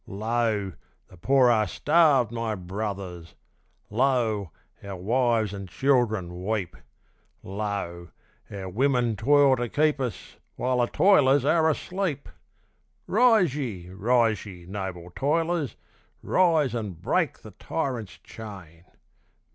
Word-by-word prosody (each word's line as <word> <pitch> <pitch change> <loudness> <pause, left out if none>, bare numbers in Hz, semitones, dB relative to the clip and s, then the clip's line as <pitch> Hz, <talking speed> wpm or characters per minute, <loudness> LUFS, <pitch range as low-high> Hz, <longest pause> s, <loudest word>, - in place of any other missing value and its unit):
Lo! 110 -2 -1 0.4
the - - -15
poor 130 +6 +4
are 110 -2 +2
starved, 145 - +3
my 115 -2 -2
brothers! 95 -3 -6 0.6
lo! 115 -5 +1 0.3
our 100 -1 -6
wives 115 +2 +1
and 100 -2 -7
children 110 -10 0
weep! 100 -3 -2 0.7
Lo! 95 -4 -4 0.4
our 95 -2 -6
women 120 +2 +1
toil 140 +4 +4
to 120 -1 -3
keep 150 +2 +1
us 120 -8 -5 0.2
while 125 0 0
the 120 - +2
toilers 145 -8 +4
are 160 +1 +3
asleep! 170 -2 -3 0.8
Rise 220 - +4
ye! 105 -12 -5
rise 115 +1 +1
ye! 90 -4 -11
noble 95 -3 -6
toilers! 160 -1 0 0.5
rise 160 -8 +2
and 105 -8 -4
break - - -1
the - - -10
tyrant's 120 -8 -4
chain! 90 -7 -11
115 Hz, 115 wpm, -26 LUFS, 95-135 Hz, 0.8 s, poor